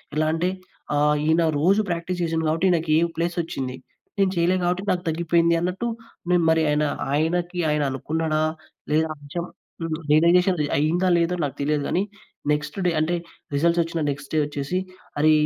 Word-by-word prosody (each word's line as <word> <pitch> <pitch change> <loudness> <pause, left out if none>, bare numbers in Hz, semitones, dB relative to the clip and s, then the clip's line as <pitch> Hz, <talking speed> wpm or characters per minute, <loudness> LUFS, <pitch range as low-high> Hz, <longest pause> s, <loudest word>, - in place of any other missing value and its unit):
ఎలా 155 0 +2
అంటే 165 +2 0 0.5
ఆహ్, 150 +1 +3
ఈయన 160 +2 +3 0.2
రోజు 195 +7 +4
ప్రాక్టీస్ 175 +1 -2
చేసాను 165 -1 0
కాబట్టి 160 +4 +1
ఈయనికి 165 -3 +1
ఏ - - +2
ప్లేసొచ్చింది. 165 -6 -2 0.4
నేను 195 -1 +3
చేయలే 170 +2 +3
కాబట్టి 180 +2 0
నాకు 180 -1 0
తగ్గిపోయింది 170 +1 +2
అన్నట్టు 180 +7 -2 0.4
నేను 175 -1 +4
మరి 160 0 +4
ఆయన 150 +1 +2 0.3
ఆయనకి 175 +4 0
ఆయన 150 0 +1
అనుకున్నాడా? 155 +3 -1 0.5
లేదా? 160 +1 +3
అని 145 -1 -15
చెప్పి 175 0 -3 0.3
హ్మ్. 165 -1 -1
రియలైజేషన్ 175 +4 +4 0.2
అయిందా, 170 +5 +2
లేదో 170 +1 +1
నాకు 140 -4 -2
తెలియదు 145 0 0
కానీ, 180 - +1 0.5
నెక్స్ట్ 150 +3 -2
డే - - +3
అంటే 160 +3 +1 0.4
రిజల్ట్స్ 170 +4 +3
వచ్చిన 165 0 -3
నెక్స్ట్ 140 0 -5
డే 155 - +3
ఒచ్చేసి 145 +5 -2 0.4
"అరే! 155 +1 +5
165 Hz, 165 wpm, -24 LUFS, 150-175 Hz, 0.5 s, అరే